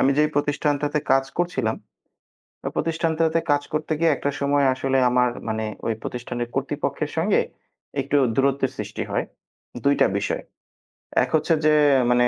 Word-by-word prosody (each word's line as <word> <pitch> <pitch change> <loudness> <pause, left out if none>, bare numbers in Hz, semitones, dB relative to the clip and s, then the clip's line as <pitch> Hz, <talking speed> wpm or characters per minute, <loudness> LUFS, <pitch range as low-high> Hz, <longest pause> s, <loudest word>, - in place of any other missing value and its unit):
আমি 135 - +4
যেই 150 0 +4
প্রতিষ্ঠানটাতে 145 0 0
কাজ 135 0 +4
করছিলাম। 130 -11 0 1.0
প্রতিষ্ঠানটাতে 165 0 +1
কাজ 145 0 +3
করতে 155 +1 -2
গিয়ে 165 -1 +4
একটা 145 - -2
সময় 140 0 +2
আসলে 135 +1 0
আমার 125 0 +3 0.2
মানে 110 0 -1 0.2
ওই 115 - +1
প্রতিষ্ঠানের 120 0 -4
কর্তৃপক্ষের 140 +2 -2
সঙ্গে 185 +6 +3 0.6
একটু 140 +2 0 0.2
দূরত্বের 135 -1 +2
সৃষ্টি 105 0 -4
হয়। - - 0 0.6
২ 140 0 +4
টা - - +7
বিষয়ে। - - -2 0.8
১ - - -3
হচ্ছে 155 +2 +2
যে 155 - +5 0.4
মানে 120 0 +4
140 Hz, 140 wpm, -23 LUFS, 130-155 Hz, 1.0 s, টা